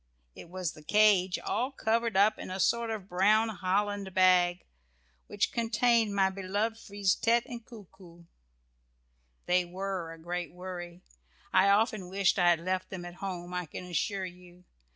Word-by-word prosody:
It 165 Hz, -, -12 dB
was 180 Hz, -2 st, -3 dB
the 155 Hz, -, -14 dB
cage, 195 Hz, 0 st, +3 dB
all 250 Hz, +6 st, -2 dB
covered 230 Hz, -4 st, 0 dB
up 210 Hz, +2 st, +4 dB
in -, -, -7 dB
a 185 Hz, +1 st, -5 dB
sort 235 Hz, +3 st, +1 dB
of 215 Hz, -4 st, -5 dB
brown 210 Hz, +5 st, +3 dB
holland 200 Hz, -1 st, -2 dB
bag, 180 Hz, -1 st, +4 dB, 0.6 s
which 205 Hz, -2 st, -1 dB
contained 230 Hz, -2 st, +2 dB
my 190 Hz, -1 st, +3 dB
beloved 205 Hz, +4 st, -2 dB
Frise 200 Hz, -3 st, 0 dB
tête 235 Hz, +1 st, +2 dB
and 235 Hz, -1 st, -8 dB
Coo 225 Hz, -4 st, -12 dB
coo. 170 Hz, -2 st, -17 dB, 1.2 s
They 180 Hz, 0 st, +3 dB
were 185 Hz, -1 st, -5 dB
a 165 Hz, -, -10 dB
great 175 Hz, +1 st, -5 dB
worry. 180 Hz, 0 st, -8 dB, 0.5 s
I 195 Hz, -, +5 dB
often 205 Hz, -2 st, +2 dB
wished 195 Hz, 0 st, +1 dB
I 175 Hz, -1 st, +5 dB
had 170 Hz, -1 st, +2 dB
left 185 Hz, +1 st, -2 dB
them 180 Hz, -2 st, -7 dB
at 175 Hz, -, -8 dB
home, 180 Hz, -2 st, -5 dB
I 180 Hz, -2 st, -3 dB
can 180 Hz, -, -8 dB
assure 190 Hz, +2 st, -2 dB
you. 180 Hz, 0 st, -13 dB
190 Hz, 165 wpm, -30 LUFS, 180-210 Hz, 1.2 s, I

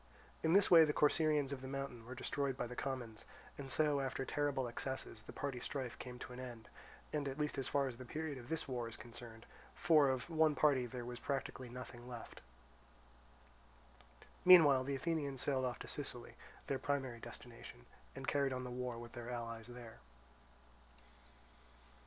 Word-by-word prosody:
In 160 Hz, +1 st, +3 dB
this 200 Hz, 0 st, +5 dB
way 165 Hz, -2 st, +11 dB
the 150 Hz, -1 st, +2 dB
Corcyraeans 150 Hz, -2 st, +3 dB
of 135 Hz, -2 st, -4 dB
the 130 Hz, -, -6 dB
mountain 135 Hz, -4 st, -5 dB
were 130 Hz, -, -6 dB
destroyed 135 Hz, +1 st, -1 dB
by 125 Hz, -, -1 dB
the 125 Hz, +1 st, -7 dB
commons; 125 Hz, -6 st, -4 dB, 0.3 s
and 135 Hz, -1 st, -7 dB
so 150 Hz, +1 st, +2 dB
after 135 Hz, 0 st, -2 dB
terrible 145 Hz, -3 st, 0 dB
excesses 130 Hz, -2 st, -3 dB
the -, -, -10 dB
party 140 Hz, -3 st, -3 dB
strife 130 Hz, -2 st, -4 dB
came 125 Hz, -1 st, -7 dB
to 125 Hz, -, -8 dB
an 125 Hz, -, -8 dB
end, 120 Hz, -3 st, -8 dB, 0.4 s
at 140 Hz, -2 st, -1 dB
least 150 Hz, -2 st, -1 dB
as 135 Hz, -, -1 dB
far 140 Hz, -1 st, +2 dB
as 125 Hz, -3 st, -5 dB
the 130 Hz, -, -7 dB
period 150 Hz, +2 st, -4 dB
of 120 Hz, -, -11 dB
this 160 Hz, -2 st, -1 dB
war 125 Hz, -3 st, -2 dB
is 115 Hz, -, -7 dB
concerned, 115 Hz, -1 st, -9 dB, 0.3 s
for 155 Hz, -5 st, +5 dB
of 130 Hz, -1 st, -1 dB
one 160 Hz, -2 st, +3 dB
party 135 Hz, -3 st, +4 dB
there 120 Hz, 0 st, -6 dB
was 120 Hz, 0 st, -6 dB
practically 135 Hz, -2 st, -3 dB
nothing 120 Hz, 0 st, -8 dB
left. 120 Hz, -2 st, -8 dB, 2.0 s
Meanwhile 150 Hz, -8 st, +9 dB
the 140 Hz, 0 st, -1 dB
Athenians 140 Hz, -2 st, -1 dB
sailed 130 Hz, -2 st, +2 dB
off 125 Hz, -2 st, -2 dB
to -, -, -8 dB
Sicily, -, -, -3 dB, 0.3 s
their 135 Hz, -, -1 dB
primary 135 Hz, -3 st, -1 dB
destination, -, -, -10 dB, 0.3 s
and 135 Hz, 0 st, -6 dB
carried 140 Hz, -2 st, +2 dB
on 130 Hz, 0 st, -3 dB
the 125 Hz, -, -5 dB
war 125 Hz, -1 st, -3 dB
with 120 Hz, 0 st, -8 dB
their 120 Hz, 0 st, -7 dB
allies 115 Hz, -2 st, -4 dB
there. 120 Hz, -, -10 dB
130 Hz, 175 wpm, -38 LUFS, 120-145 Hz, 2.0 s, way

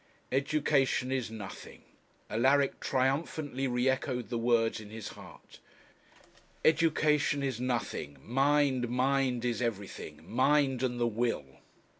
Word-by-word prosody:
Education 135 Hz, -2 st, +1 dB
is 130 Hz, -4 st, -1 dB
nothing! 105 Hz, -4 st, -9 dB, 0.4 s
Alaric 135 Hz, +5 st, +2 dB
triumphantly 135 Hz, +1 st, -1 dB
re 125 Hz, +1 st, 0 dB
echoed 130 Hz, -4 st, -1 dB
the 120 Hz, -, -2 dB
words 115 Hz, -1 st, +2 dB
in 105 Hz, -2 st, -10 dB
his 110 Hz, -1 st, -7 dB
heart -, -, -14 dB, 1.1 s
'Education 155 Hz, -3 st, +3 dB
is 130 Hz, -3 st, -2 dB
nothing 120 Hz, -, -2 dB
mind, 135 Hz, -1 st, +2 dB
mind 130 Hz, -1 st, +1 dB
is 120 Hz, -1 st, -1 dB
everything; 105 Hz, -5 st, -4 dB
mind 135 Hz, +1 st, +2 dB
and 125 Hz, -2 st, -1 dB
the 120 Hz, -, +2 dB
will.' 115 Hz, -, -2 dB
130 Hz, 115 wpm, -31 LUFS, 115-140 Hz, 1.1 s, Education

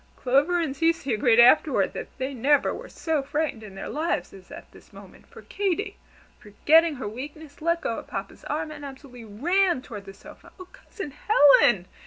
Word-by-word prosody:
Clover 285 Hz, +8 st, +1 dB
and 305 Hz, -5 st, -2 dB
Cecy 325 Hz, -4 st, 0 dB
agreed 225 Hz, +2 st, +3 dB
afterward 260 Hz, +5 st, +4 dB
that -, -, -6 dB
they 265 Hz, +1 st, -4 dB
never 275 Hz, +4 st, +2 dB
were -, -, -9 dB
so 320 Hz, -3 st, -2 dB
frightened 285 Hz, -3 st, -3 dB
in 205 Hz, -3 st, -11 dB
their 195 Hz, -, -7 dB
lives 305 Hz, -, -3 dB
as 190 Hz, -2 st, -15 dB
at -, -, -12 dB
this -, -, -19 dB
moment; -, -, -15 dB
for -, -, -14 dB
Katy, 400 Hz, +1 st, -3 dB, 0.4 s
forgetting 305 Hz, +10 st, +3 dB
her 260 Hz, -, -6 dB
weakness, 285 Hz, +7 st, -9 dB
let 335 Hz, +1 st, 0 dB
go 230 Hz, -, -3 dB
of -, -, -13 dB
Papa's 195 Hz, 0 st, -7 dB
arm, 310 Hz, +1 st, -3 dB
and 295 Hz, -1 st, -10 dB
absolutely 265 Hz, -4 st, -11 dB
ran 340 Hz, -, 0 dB
toward 205 Hz, -3 st, -9 dB
the 195 Hz, -, -10 dB
sofa. -, -, -16 dB
"Oh, 370 Hz, -, -9 dB
Cousin 380 Hz, -9 st, -9 dB
Helen! 280 Hz, -, +4 dB
285 Hz, 185 wpm, -25 LUFS, 235-320 Hz, 0.4 s, afterward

